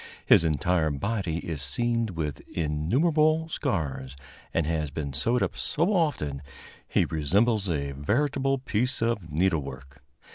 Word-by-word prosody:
His - - +6
entire 80 +1 +1
body 85 +3 -2
is 80 -4 -3
seamed 115 - 0
with 80 -5 -4
innumerable 150 - +2
scars, 70 - -2 0.4
and 85 - +1
has 80 -1 -1
been 70 -1 -4
sewed 115 - +1
up 100 - -2
so 165 - 0
often 145 - 0
that 70 - -12 0.4
he - - +2
resembles 100 +7 +1
a 70 -4 -1
veritable 135 - 0
piece 125 -1 -1
of 115 -8 -1
needlework. 70 -6 -2
85 Hz, 135 wpm, -27 LUFS, 75-120 Hz, 0.4 s, His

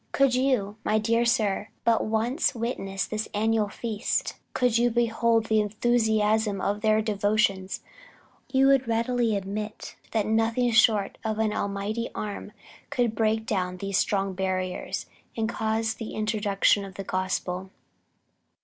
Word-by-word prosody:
Could 275 -2 +3
you, 250 -6 +1
my 215 - +2
dear 230 +2 +2
sir, 215 -3 +1
but 230 -1 +3
once 230 +7 0
witness 195 -5 -2
this 215 0 -4
annual 220 0 +1
feast, 220 +1 -2 0.2
could 245 -2 +2
you 240 0 +3
behold 230 -1 +2
the 220 -1 +2
enthusiasm 220 -1 +1
of 205 +2 -1
their 215 0 +3
devotions, 205 -2 0 0.7
you 265 0 +4
would 270 -2 +4
readily 230 0 +1
admit 210 +2 -5
that 220 -2 0
nothing 225 +3 +1
short 215 -3 +3
of 220 -1 -2
an 220 -1 +1
Almighty 200 +3 -2
arm 205 0 -5 0.4
could 245 -5 0
break 220 0 +1
down 185 -4 -1
these 195 0 -1
strong 195 -1 0
barriers, 185 -1 -2 0.3
and 220 -1 0
cause 220 0 -1
the 225 -1 -7
introduction 210 -2 +2
of 195 -1 -9
the 195 - -5
gospel." 185 0 -2
220 Hz, 140 wpm, -26 LUFS, 200-230 Hz, 0.7 s, you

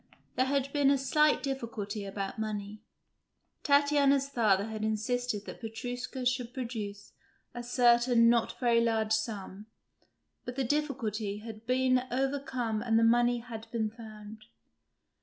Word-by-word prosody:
There 255 +1 +2
had 275 0 -1
been 285 -2 +3
a 280 - +4
slight 300 +3 +2
difficulty 225 -7 -4
about 195 +1 -5
money. 210 -1 -4 0.8
Tatiana's 280 -1 +3
father 210 -7 +2
had 220 -1 -5
insisted 220 0 -1
that - - -9
Petrushka 245 +3 -5
should 250 -1 -1
produce 215 -5 -6 0.4
a 240 - -5
certain 240 -1 +4
not 235 -1 +2
very 235 -2 +3
large 220 -2 0
sum; 210 -2 -3 0.8
but 245 - -6
the 270 - 0
difficulty 235 -7 -2
had 220 +1 -10
been 255 0 +3
overcome 260 -4 -1
and 225 -1 +2
the 225 - +4
money 240 +1 +3
had 225 -1 -9
been 220 -2 -2
found. 215 -1 -11
235 Hz, 135 wpm, -30 LUFS, 215-255 Hz, 0.8 s, a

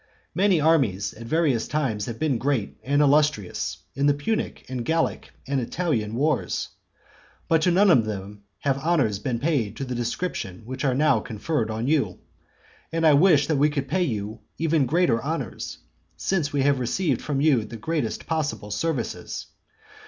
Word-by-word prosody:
Many 185 0 +3
armies 130 - +2
at 115 +1 -10
various 150 -6 +1
times 130 -9 -1
have 115 -1 -5
been 145 -6 0
great 130 -5 -1
and 145 +4 +3
illustrious 145 -8 +1 0.2
in 140 +2 +1
the 145 - +4
Punic, 215 +10 -2
and 125 -2 -4
Gallic, 165 +6 0 0.2
and 135 -1 0
Italian 115 -6 -1
wars; 145 +2 0 0.8
but 165 -1 +3
to 180 - +3
none 190 +2 +5
of 120 -8 +5
them 100 -1 -6 0.2
have 135 -1 +1
honours 135 - +1
been 120 +3 -2
paid 120 -6 -1
of 135 - -3
the 125 - -3
description 120 - -3
which 130 +3 -5
are 130 -3 +2
now 145 -4 +3
conferred 110 +3 -2
on 110 +2 -2
you. 145 0 +1 0.7
And 165 0 0
I 155 - +7
wish 150 -1 +5
that 155 0 0
we 145 +2 +4
could 140 -2 -3
pay 185 +7 0
you 110 - -2 0.2
even 160 -4 +2
greater 160 -6 +2
honours, 160 +4 -4 0.4
since 170 -7 0
we 140 -2 +1
have 140 -1 +3
received 130 +3 0
from 145 -2 -2
you 140 -6 +3
the 115 +2 -8
greatest 135 -1 -2
possible 150 -10 -2
services. 130 +2 -3
140 Hz, 170 wpm, -25 LUFS, 115-160 Hz, 0.8 s, I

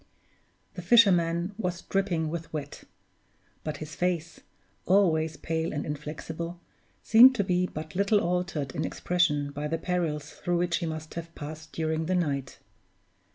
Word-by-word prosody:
The 180 - -6
fisherman 180 -3 +4
was 180 -4 -2
dripping 180 -5 0
with 165 -1 -5
wet; 145 -2 -6 0.8
but 155 -2 -4
his 155 +1 -8
face, 175 -2 -2 0.5
always 160 -5 +3
pale 160 0 -2
and 145 - -3
inflexible, 155 +3 -5 0.4
seemed 250 +4 +8
to 205 - +1
be 180 -1 +1
but 155 -1 -7
little 200 +3 +3
altered 175 -6 -1
in 155 - -2
expression 150 -5 0
by 145 +1 -4
the 165 +2 -1
perils 160 -5 -2
through 175 0 -2
which 175 0 +1
he 170 - -3
must 155 -1 -6
have 170 0 -7
passed 155 +1 -8
during 160 0 -1
the 185 - +1
night. 140 -7 -1
165 Hz, 150 wpm, -28 LUFS, 155-180 Hz, 0.8 s, seemed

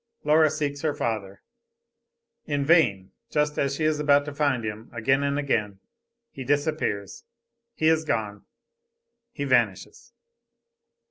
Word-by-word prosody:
Laura 155 +1 +4
seeks 145 -1 -3
her 155 -2 -1
father. 100 -4 -4 1.0
In 145 -2 -1
vain 125 - +3 0.2
just 150 0 0
as 140 0 0
she 155 - -3
is 155 -1 +1
about 145 -1 +3
to 145 - -6
find 140 -5 0
him, 110 +1 -6
again 135 +4 +1
and 140 0 0
again 105 -9 -1 0.5
he 135 - -7
disappears, 145 -7 -1 0.5
he 155 - -2
is 160 0 +3
gone, 105 -8 -3 0.9
he 145 - -5
vanishes. 120 - 0
140 Hz, 130 wpm, -25 LUFS, 110-150 Hz, 1.0 s, Laura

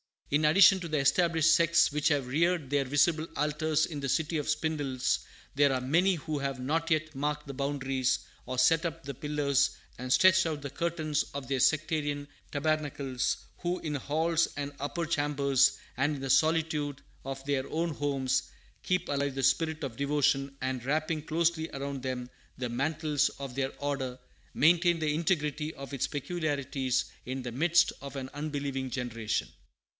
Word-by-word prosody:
In 150 +2 +3
addition 190 +5 +7
to 175 - -5
the 155 -1 -1
established 160 +2 +4
sects 170 0 +4
which 150 +1 0
have 145 -4 +2
reared 160 +2 +1
their 140 -1 +1
visible 155 +4 +2
altars 150 +1 +1
in 150 -3 -6
the 135 -1 -3
City 160 +4 0
of 150 0 -3
Spindles, 145 -5 0 0.4
there 140 -1 +4
are 130 - -1
many 175 +9 +3
who 155 -2 -4
have 135 -1 -2
not 160 +6 -1
yet 155 0 0
marked 150 +2 -2
the 140 - -7
boundaries 135 -2 0 0.3
or 130 +1 -4
set 160 +7 +4
up 165 0 -4
the 140 0 -5
pillars 140 0 +1 0.3
and 125 0 -5
stretched 185 +5 +6
out 155 -3 -2
the 140 - -5
curtains 155 0 -1
of 140 -2 -5
their 135 -1 0
sectarian 145 -1 +1 0.2
tabernacles; 145 -4 -1 0.2
who, 175 +1 -1
in 155 -2 -4
halls 160 +4 +1
and 145 0 -4
"upper 155 +5 -2
chambers" 140 -3 +2 0.2
and 145 +3 +1
in 135 - -7
the 135 - -4
solitude 155 -2 +2 0.2
of 135 0 -6
their 140 -2 -1
own 165 +2 -1
homes, 135 -3 0 0.4
keep 185 -1 0
alive 140 -1 -1
the 135 - -2
spirit 160 +4 +1
of 125 -5 -5
devotion, 140 -1 +1
and, 130 -2 -2
wrapping 155 +2 0
closely 160 +1 0
around 140 0 -4
them 125 -2 -3 0.3
the 125 -1 -3
mantles 150 +4 0
of 135 -2 -6
their 135 +1 -2
order, 140 -3 -2 0.4
maintain 170 +2 +4
the 155 -2 0
integrity 155 -2 -1
of 140 +1 -9
its 135 - 0
peculiarities 140 -4 -1 0.2
in 130 +1 -4
the 125 - -4
midst 170 +7 +3
of 140 0 -8
an 130 -1 -5
unbelieving 140 -3 -3
generation. 115 -4 -2
145 Hz, 170 wpm, -30 LUFS, 135-160 Hz, 0.4 s, addition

